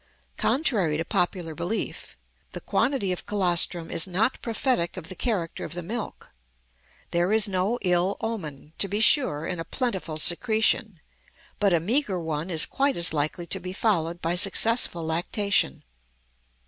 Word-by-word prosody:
Contrary 205 - +1
to 165 - -3
popular 175 -2 -1
belief, 170 +8 -4 0.4
the - - -5
quantity 255 -9 0
of 180 - -5
colostrum 175 -4 0
is 165 - +4
not 205 +8 0
prophetic 230 -6 -1
of 160 - -8
the 185 - -7
character 190 -9 -2
of - - -6
the 175 - -5
milk; 220 +6 -6 0.8
there 175 +3 +1
is 220 0 +4
no 195 +4 0
ill 180 +1 +1
omen, 155 -10 -6
to 200 - 0
be 205 +2 -2
sure, 215 - +4
in 180 0 -4
a - - -3
plentiful 190 - -3
secretion, 215 +2 +2 0.6
but 200 -2 +3
a 170 - +3
meager 205 - 0
one 160 0 -4
is 165 -3 +4
quite 275 0 0
as 170 -1 +1
likely 155 +3 -2
to 190 - -2
be 185 0 -7
followed 175 -5 0
by 165 +1 0
successful 195 -1 +2
lactation. 175 - 0
180 Hz, 155 wpm, -25 LUFS, 165-220 Hz, 0.8 s, is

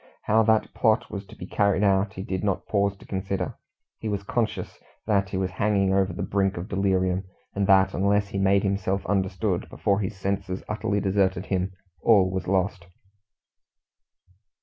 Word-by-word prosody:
How 110 +2 +4
that 110 0 +2
plot 115 +1 +2
was 100 -1 -6
to - - -13
be - - -8
carried 100 +1 +1
out, 100 +1 +2
he 95 - -6
did 95 0 -3
not 100 -3 -1
pause 100 -1 0
to - - -16
consider; 95 0 -3 0.5
he 110 - -3
was 100 -1 -2
conscious 110 +2 -2 0.3
that 100 -3 +1
he 95 - -3
was 95 -1 -1
hanging 100 -2 +1
over 95 0 +2
the - - -4
brink 95 -1 0
of 85 +3 -5
delirium, 95 -2 +1 0.3
and 100 -1 0
that, 95 0 +5
unless 100 +2 +1
he 100 - -3
made 95 0 +3
himself 100 -1 -1
understood 95 -2 -1
before 100 -1 0
his 100 0 -3
senses 95 -1 -3
utterly 105 -1 -1
deserted 95 -1 +1
him, 95 -1 -1 0.3
all 100 -5 +5
was 95 0 -3
lost. 95 -1 0
100 Hz, 170 wpm, -25 LUFS, 95-100 Hz, 0.5 s, that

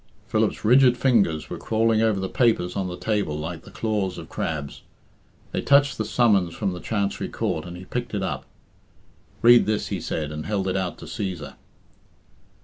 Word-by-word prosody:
Philip's - - 0
rigid 125 +1 +6
fingers 110 - +2
were - - -5
crawling 110 0 +2
over 110 -3 +2
the 95 - -2
papers 110 -6 +1
on 95 -2 -1
the 90 0 -6
table 105 -9 -1
like 80 +2 -5
the - - -11
claws 105 -5 -2
of 80 -1 -9
crabs. 75 -3 -4 0.7
They - - -1
touched 140 -3 +4
the 110 - 0
summons 100 -8 +2
from 100 -4 -1
the 90 - -6
Chancery 100 -1 -2
Court, - - -2
and 90 0 -8
he 90 - -10
picked 120 0 -4
it 100 - -1
up. - - -3 1.0
"Read 120 -1 +7
this," 110 -1 -1
he - - -3
said, 75 -2 -3
and 75 0 -5
held 100 -2 -1
it 95 - -1
out 90 -4 -2
to - - -10
Cæsar. 95 -5 -5
100 Hz, 185 wpm, -24 LUFS, 90-115 Hz, 1.0 s, Read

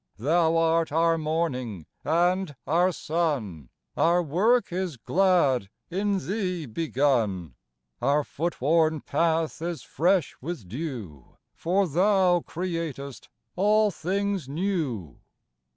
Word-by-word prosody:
Thou 160 +7 +2
art 165 -1 +2
our 165 +1 +2
Morning 130 - -2 0.2
and 175 0 +1
our 175 +4 +3
Sun; 140 - -2 0.3
Our 175 +1 +3
work 195 - +2
is 180 -6 -2
glad, 145 - +2 0.2
in 200 +2 0
Thee 185 -5 -2
begun; 120 - 0 0.5
Our 140 +4 +2
footworn 160 0 0
path 165 -1 0
is 170 -1 -4
fresh 180 -2 +1
with 150 - -6
dew, 110 - -7 0.2
For 185 +3 +1
Thou 180 +2 +3
createst 165 -6 -5 0.3
all 210 +2 +3
things 195 -3 -2
new. 145 - -2
165 Hz, 105 wpm, -26 LUFS, 140-180 Hz, 0.5 s, our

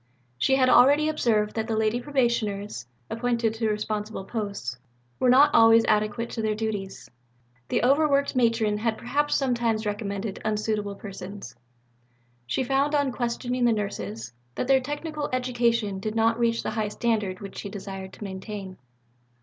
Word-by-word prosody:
She 265 - +3
had 260 -1 +3
already 285 +4 +6
observed 215 -8 +1
that 220 -1 -2
the 225 -2 -1
Lady 220 +2 +1
Probationers, 215 - -1 0.2
appointed 230 -1 0
to 225 -1 -1
responsible 210 -1 -3
posts, 200 - -4 0.4
were 255 - +3
not 285 +4 +6
always 225 0 +6
adequate 215 +2 0
to 225 - -3
their 215 -1 0
duties: 210 -3 -4 0.6
the - - 0
overworked 280 +1 +3
Matron 225 -4 +2
had 220 0 0
perhaps 290 +5 0
sometimes 235 -5 0
recommended 205 -1 -3
unsuitable 210 -1 -1
persons. 195 - -8 0.9
She 195 - 0
found 275 +3 +1
on 285 -2 +2
questioning 245 +1 -1
the 235 - +4
Nurses 115 - -4 0.2
that - - -2
their 265 -1 +4
technical 295 +2 -4
education 235 -5 0
did 215 +2 -4
not 225 +1 +2
reach 230 -1 +1
the - - -2
high 220 -2 -1
standard 210 -3 -1
which 200 -1 -8
she 200 - -6
desired 195 -1 -7
to - - -10
maintain. 190 -1 -7
225 Hz, 150 wpm, -26 LUFS, 205-245 Hz, 0.9 s, already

